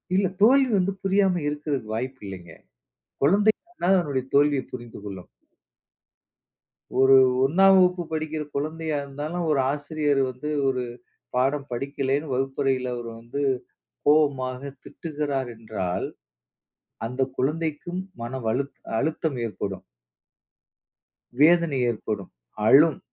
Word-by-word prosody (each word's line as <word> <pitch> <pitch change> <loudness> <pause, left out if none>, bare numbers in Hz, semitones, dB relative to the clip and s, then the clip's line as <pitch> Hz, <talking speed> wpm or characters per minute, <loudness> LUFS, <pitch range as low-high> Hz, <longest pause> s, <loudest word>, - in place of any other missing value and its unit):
இல்ல. 195 0 +3
தோல்வி 260 +4 +6
வந்து 190 +1 +1
புரியாம 195 -2 +2
இருக்கிறதுக்கு 145 -7 -3
வாய்ப்பு 130 +3 -4
இல்லேங்க. 90 -4 -9 0.7
குழந்தைகூட 205 - +2
அதனுடைய 140 -6 -2
தோல்வியை 145 -2 +4
புரிந்து 120 -4 -8
கொள்ளும். 95 -3 -8 1.7
ஒரு 135 0 +7 0.3
1ஆம் 190 +7 +6
வகுப்பு 180 -1 +3
படிக்கிற 155 -1 -2
குழந்தையா 155 +1 -2
இருந்தாலும், 150 +5 -4
ஒரு 145 - +2
ஆசிரியர் 145 -1 0
வந்து 130 +4 -5 0.2
ஒரு 130 -1 0 0.5
பாடம் 135 +3 +1
படிக்கலன்னு 135 +3 -2
வகுப்பறையில 135 -1 0
அவரு 120 -1 -6
வந்து 120 +5 -5 0.7
கோவமாக 140 -4 +2 0.2
திட்டுகிறார் 145 -5 -3
என்றால், 110 -5 -3 1.0
அந்த 125 +3 -5 0.2
குழந்தைக்கும் 160 +5 -1 0.2
மனவழுத் 125 +2 -2 0.2
அழுத்தம் 155 -2 -1
ஏற்படும். 100 -3 -5 1.6
வேதனை 165 -2 +5
ஏற்படும். 105 -3 -5 0.4
அழும். 150 +3 +6
140 Hz, 100 wpm, -25 LUFS, 125-160 Hz, 1.7 s, ஒரு